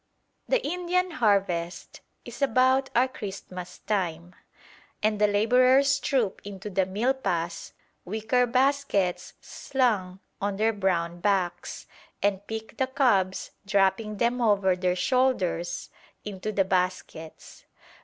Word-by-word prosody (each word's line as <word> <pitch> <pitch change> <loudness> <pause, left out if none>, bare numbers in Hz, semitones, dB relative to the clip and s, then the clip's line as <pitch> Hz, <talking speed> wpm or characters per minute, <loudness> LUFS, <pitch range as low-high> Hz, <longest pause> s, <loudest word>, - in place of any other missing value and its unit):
The - - +1
Indian 360 +3 0
harvest 195 - 0 0.2
is 240 +3 -10
about 260 +1 +3
our 250 +2 +4
Christmas 190 -6 -8
time, 180 -4 -2 0.7
and 210 -1 +1
the 210 - +6
labourers 255 +6 +4
troop 250 -9 0
into 200 0 -7
the 190 0 +1
milpas, 190 -6 -2 0.3
wicker 220 +6 0
baskets 255 -7 0
slung 210 -9 -1 0.2
on 200 0 -1
their 220 +2 +2
brown 175 -4 -1
backs, 190 -2 -1 0.4
and 200 -1 0
pick 220 +1 -6
the 260 - +1
cobs, 235 -9 +1
dropping 200 +1 +1
them 240 +3 +1
over 200 -4 +3
their 180 0 0
shoulders 180 -6 0 0.3
into 205 +1 -4
the 195 -2 +1
baskets. 180 -4 -3
205 Hz, 115 wpm, -26 LUFS, 185-255 Hz, 0.7 s, the